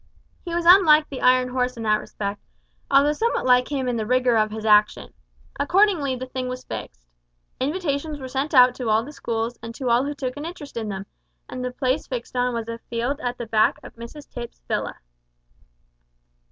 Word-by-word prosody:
He 340 -2 -4
was 345 0 -1
unlike 315 -5 +7
the 270 - -6
iron 255 0 +4
horse 250 0 -1
in 230 - -5
that 215 -1 +2
respect, 200 0 -5 0.5
although 280 +2 +4
somewhat 460 +10 -1
like 250 0 +4
him 270 -3 -1
in 245 -1 0
the 220 - -2
rigour 250 0 +3
of 215 -1 +2
his 220 0 -6
action. 210 -1 +3 0.5
Accordingly 335 -3 +2
the 255 +1 -5
thing 255 0 -4
was 255 0 -5
fixed. - - -8 0.5
Invitations 295 0 -2
were 260 - -6
sent 270 +3 -2
out 250 -1 +7
to 250 -3 -4
all 220 +1 +3
the 290 - -9
schools 235 -3 -3
and 230 0 -8
to 255 -2 -2
all 240 +2 +4
who 290 +1 -4
took 255 -3 -4
an 295 - -5
interest 330 -4 -8
in 225 -2 -3
them, 195 0 -5 0.4
and 255 0 -6
the 250 - -1
place 255 +3 -1
fixed 250 -1 -6
on 250 0 +1
was 230 -1 -4
a 230 0 -5
field 240 +5 -2
at 245 -3 -3
the 235 - -5
back 215 -1 +2
of - - -11
Mrs 235 +6 -10
Tipps's 235 - -9
villa. - - -2
255 Hz, 205 wpm, -23 LUFS, 230-285 Hz, 0.5 s, unlike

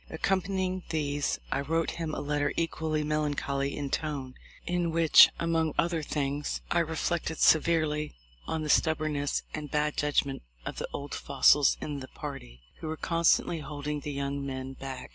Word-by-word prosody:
Accom 190 +4 +1
panying 185 -1 -2
these 145 -3 -1
I - - +1
wrote 165 +3 0
him 165 -2 -4
a - - -3
letter 145 -1 0
equally 160 -2 -1
melan 150 -1 0
choly 140 0 -2
in 140 -2 -4
tone, 140 -4 -3 0.3
in 175 -1 0
which 165 -1 +8
among 165 -2 0
other 170 -1 +1
things 145 -1 -2
I 175 - +3
reflected 165 0 -1
severely 155 -1 +3 0.3
on 160 -1 -2
the 150 - -4
stubbornness 155 -2 +1
and 150 -1 -5
bad 150 +1 0
judgment 145 -2 +1 0.2
of - - -5
the - - -3
old 145 0 -6
fossils 140 +1 +4
in 145 -2 -4
the 130 - -8
party, 130 - -8 0.2
who 160 - -6
were 160 0 -3
constantly 170 0 +2
holding 150 0 -4
the 145 +1 -5
young 140 0 -3
men 130 -1 -5
back. 135 -1 -7
150 Hz, 165 wpm, -29 LUFS, 140-160 Hz, 0.3 s, which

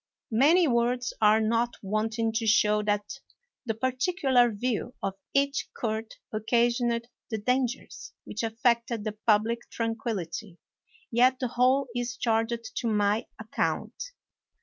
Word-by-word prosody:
Many 310 +10 +5
words 245 0 +1
are 215 0 +6
not 230 +2 +1
wanting 220 +3 -1
to 225 -1 -1
show 210 -1 +4
that 210 +5 -2 0.5
the 225 - 0
particular 260 0 +2
view 240 +2 -2
of 195 - -1 0.2
each 280 0 +1
court 220 -1 -3 0.2
occasioned 235 +1 +1 0.2
the 220 - -2
dangers 250 +3 -2
which 215 - -5
affected 235 0 0
the 215 -1 -4
public 225 +2 +2
tranquil 225 0 -2
lity; 185 +1 -6 0.5
yet 250 +2 +4
the 255 - -1
whole 255 +3 +3
is 240 -1 -3
charged 225 0 -1
to 235 - -1
my 210 0 +1
account. 220 0 -2
230 Hz, 125 wpm, -28 LUFS, 220-245 Hz, 0.5 s, are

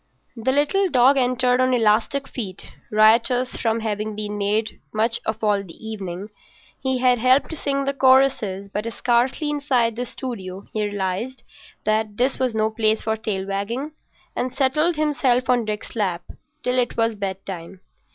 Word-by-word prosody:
The 240 +3 0
little 330 +8 +2
dog 260 -1 +5
entered 250 0 +2
on 255 0 +3
elastic 230 +5 +2
feet, 200 -7 -7 0.2
riotous 230 +4 +3
from 225 -1 0
having 215 -1 -2
been 210 0 -4
made 210 +2 -1
much 225 +2 0
of 220 0 -3
all 205 -2 +2
the 185 -4 -12
evening. 200 -3 -6 0.5
He 260 -1 0
had 250 -1 +3
helped 255 +6 +3
to - - -2
sing 275 -2 -1
the 275 - 0
choruses; 260 -8 +3
but 210 +3 -3
scarcely 255 +6 +1
inside 255 -6 +1
the 245 +1 -3
studio 195 -8 -6
he 215 -1 0
realised 205 +5 -3 0.4
that 215 -1 0
this 255 +2 +1
was 255 -3 0
no 220 0 +1
place 220 0 +1
for 220 0 0
tail 210 -3 -3
wagging, 215 +9 -3 0.4
and 250 +1 -1
settled 300 +6 +1
himself 275 -5 +1
on 245 -2 +2
Dick's 210 +2 -5
lap 185 -6 -1 0.4
till 250 0 +1
it 240 -2 -1
was 230 0 +2
bedtime. 190 -3 -6
230 Hz, 160 wpm, -22 LUFS, 210-260 Hz, 0.5 s, dog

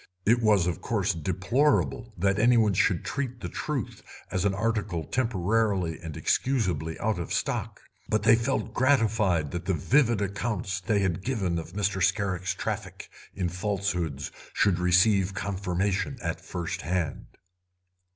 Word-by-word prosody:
It 120 +3 +4
was, 105 -5 +4
of 90 -2 -2
course, - - 0
deplorable 110 - +1
that 95 +3 +1
any 120 +2 +5
one 110 -3 +3
should 90 -1 +1
treat 130 -3 -3
the - - -3
truth - - -4 0.3
as 95 +1 0
an 100 -1 +2
article 105 -5 -1
temporarily 100 - 0
and 80 -2 -7
excusably 85 - 0
out 110 -5 0
of 85 - -5
stock, - - -2 0.3
but 110 -1 +1
they 110 +2 +7
felt 115 0 -1
gratified 110 - +2
that 85 0 -4
the 95 - +1
vivid 120 - +3
accounts 100 -1 -2
they 100 +1 +1
had 95 -1 -1
given 95 -10 -1
of 85 +1 -9
Mr. 100 -1 -1
Scarrick's 95 -1 0
traffic - - -5 0.2
in 95 -2 -1
falsehoods 90 -5 -2 0.2
should 95 -3 +2
receive 95 +2 +3
confirmation 100 +5 -1
at 85 -1 -3
first 90 0 -4
hand. 85 -3 -2
95 Hz, 145 wpm, -27 LUFS, 90-110 Hz, 0.3 s, they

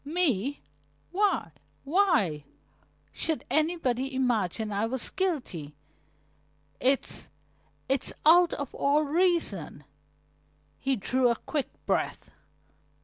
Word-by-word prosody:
"Me? 285 - 0 0.5
Why 400 +2 +1 0.3
why 280 - +2 0.7
should 320 -2 -2
anybody 275 -5 0
imagine 220 -5 0
I 205 +2 0
was 260 +1 -3
guilty? 250 - -2 1.0
It's 265 +1 0 0.6
it's 270 -1 0
out 345 +2 +7
of 285 - -5
all 290 +2 +2
reason." 300 - 0 1.0
He 270 0 +1
drew 250 +4 +2
a 235 - +2
quick 275 +3 -3 0.2
breath. - - -1
270 Hz, 90 wpm, -28 LUFS, 230-325 Hz, 1.0 s, out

